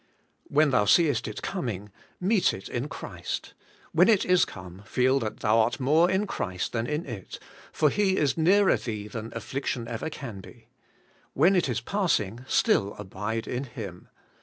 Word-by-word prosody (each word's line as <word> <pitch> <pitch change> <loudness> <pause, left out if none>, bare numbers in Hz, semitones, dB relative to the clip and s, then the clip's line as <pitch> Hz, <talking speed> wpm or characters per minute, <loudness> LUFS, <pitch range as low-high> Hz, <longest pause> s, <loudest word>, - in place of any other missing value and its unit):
When 150 0 +3
thou 105 -5 +3
seest 140 - +3
it 105 - -6
coming, 110 - -4 0.3
meet 195 +1 +2
it 95 - -9
in 125 +3 -3
Christ; - - -6 0.4
when 180 +6 +5
it 215 -4 +4
is 180 -1 +4
come, 95 -1 -10
feel 130 +5 +2
that 110 -4 -5
thon 105 - +3
art 115 +3 +2
more 155 +7 +4
in 190 +2 +1
Christ 95 - -3
than 115 0 -1
in 150 +3 -2
it, 115 -8 -7 0.3
for 150 -2 +2
He 195 -2 +2
is 145 -3 +2
nearer 190 +5 +4
thee 105 -3 -5
than 115 +1 -6
affliction 130 -3 -3
ever 115 +6 -4
can 120 -10 -7
be; - - -16 0.6
when 175 +8 +4
it 175 -6 +2
is 120 -2 -1
passing, 120 - 0
still 100 +1 +2
abide 105 +3 -4
in 125 +3 -3
Him. 105 -8 -8
125 Hz, 170 wpm, -27 LUFS, 105-165 Hz, 0.6 s, when